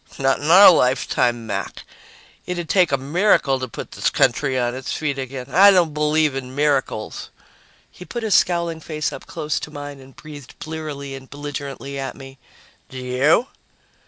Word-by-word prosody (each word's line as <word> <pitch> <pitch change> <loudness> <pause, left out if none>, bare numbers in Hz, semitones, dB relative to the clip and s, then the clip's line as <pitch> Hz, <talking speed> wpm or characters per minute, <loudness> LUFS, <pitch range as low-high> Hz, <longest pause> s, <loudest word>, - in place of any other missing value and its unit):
"Not 135 0 +1
in 150 - -3
our 190 +4 +9
lifetime, 125 -5 +1
Mac. 100 -2 -5 0.6
It'd 175 -2 -4
take 180 -3 +3
a 140 - +2
miracle 140 -1 +2
to 130 - -4
put 115 - -8
this - - 0
country 130 +2 +1
on 120 -1 0
its 130 0 -6
feet 140 -3 -2
again. 130 -1 -6
I 200 +2 +7
don't 175 -6 +3
believe 150 0 +1
in 130 -1 -6
miracles." 140 -6 -1 0.6
He - - -12
put 240 +4 -6
his 215 -3 0
scowling 170 -2 +2
face 155 -1 -4
up - - -10
close 155 -2 -3
to - - -7
mine 145 -1 -8
and 135 0 -16
breathed 150 -3 -12
blearily 150 -3 -6
and 130 -1 -10
belligerently 140 -1 -6
at 135 -1 -5
me. 135 0 -12 0.5
"Do 130 - -10
you?" 130 - +2
145 Hz, 170 wpm, -21 LUFS, 135-160 Hz, 0.6 s, our